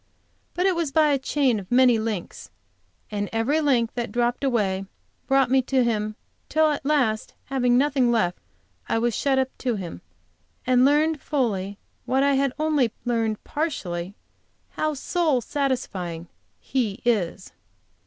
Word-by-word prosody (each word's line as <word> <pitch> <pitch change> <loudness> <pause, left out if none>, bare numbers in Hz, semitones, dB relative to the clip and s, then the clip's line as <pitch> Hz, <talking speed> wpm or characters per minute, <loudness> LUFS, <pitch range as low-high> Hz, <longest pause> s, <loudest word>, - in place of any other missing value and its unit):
But 360 - +1
it 380 -2 +3
was 335 -4 -1
by 310 +1 +4
a 280 -2 +2
chain 265 -4 +1
of 190 +1 -11
many 245 -2 +5
links; 210 - -4 0.6
and 205 -1 -2
every 245 +8 +1
link 245 -6 +2
that 240 -1 -3
dropped 240 +2 0
away, 200 -7 0 0.4
brought 270 -2 +3
me 265 0 +5
to 260 0 +1
Him, 215 -2 -1 0.3
till 315 -1 +3
at 295 - -3
last, 265 -7 0 0.2
having 250 -2 +3
nothing 265 -3 +2
left, 195 -7 +1 0.5
I - - +2
was 235 0 0
shut 275 -2 +1
up 265 0 0
to 245 -3 -1
Him, 180 -5 -6 0.6
and 255 0 +4
learned 300 +1 +2
fully, 205 -8 -1 0.3
what 265 +1 +2
I 280 0 +3
had 275 0 +2
only 300 -6 +1
learned 225 -3 -1
partially, 195 - -3 0.6
how 310 -1 -1
soul 310 -1 +1
satisfying 210 - -3 0.3
He 245 -4 -2
is." 195 -5 0
250 Hz, 150 wpm, -24 LUFS, 215-280 Hz, 0.6 s, many